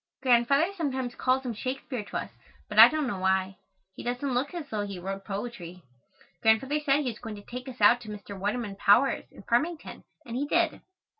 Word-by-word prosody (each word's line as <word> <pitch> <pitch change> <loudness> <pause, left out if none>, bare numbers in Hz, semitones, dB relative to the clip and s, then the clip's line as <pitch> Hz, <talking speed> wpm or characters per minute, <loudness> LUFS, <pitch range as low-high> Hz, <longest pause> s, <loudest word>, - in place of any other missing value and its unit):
Grandfather 270 +8 +3
sometimes 260 -7 -2
calls 260 +1 0
him 240 - -2
Shakespeare 255 +1 -4
to - - -4
us, - - -5 0.4
but - - 0
I - - +13
don't 310 -2 -1
know 205 -7 -3
why. 190 0 +1 0.4
He - - -9
doesn't 250 +3 -2
look 255 +4 0
as 325 -4 -5
though 215 -4 -2
he 200 -2 -6
wrote 195 +2 -6
poetry. 195 -4 -6 0.6
Grandfather 235 +7 +3
said 290 -1 +2
he 255 -4 -1
was 220 - -12
going 225 -3 -7
to 205 - -11
take 250 +2 -7
us 255 - -10
out 235 +4 +6
to 220 - -10
Mr. 205 -1 -8
Waterman 205 +1 -3
Powers' 240 +8 +3
in - - -14
Farmington 305 - -1 0.2
and 235 -2 -6
he 280 +3 -1
did. 335 +1 +1
245 Hz, 205 wpm, -28 LUFS, 205-270 Hz, 0.6 s, I